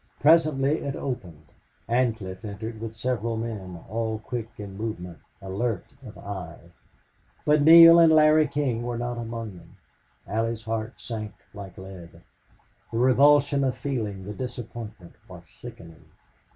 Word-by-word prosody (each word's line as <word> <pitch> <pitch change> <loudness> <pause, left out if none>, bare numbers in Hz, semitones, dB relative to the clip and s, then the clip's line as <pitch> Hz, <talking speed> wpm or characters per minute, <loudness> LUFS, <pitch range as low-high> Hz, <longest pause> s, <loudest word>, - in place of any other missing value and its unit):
Presently 155 -2 +4
it 140 - -4
opened. 90 - -6 0.4
Ancliffe 115 -5 -1
entered 110 +2 -6
with 115 -1 -6
several 115 -1 -2
men, 100 -6 -5
all 110 +1 -2
quick 115 +1 -5
in 100 -2 -8
movement, 90 -6 -6 0.2
alert 100 +2 -2 0.2
of 110 -5 -11
eye. 90 -4 -8 0.7
But 150 0 +4
Neale 165 +2 +10
and 165 -1 +7
Larry 155 0 +5
King 140 -5 -1
were 120 0 -3
not 120 0 -3
among 115 -4 -6
them. - - -17 0.5
Allie's 115 +2 -2
heart 110 +1 -3
sank 110 -3 -6 0.2
like 100 -2 -10
lead. 95 -3 -11 0.7
The 115 - -3
revulsion 140 +3 +4
of 130 -1 0
feeling, 105 -9 -4
the 105 - -6
disappointment, 115 -5 -8 0.2
was - - -12
sickening. 80 -1 -13
115 Hz, 135 wpm, -25 LUFS, 100-130 Hz, 0.7 s, Neale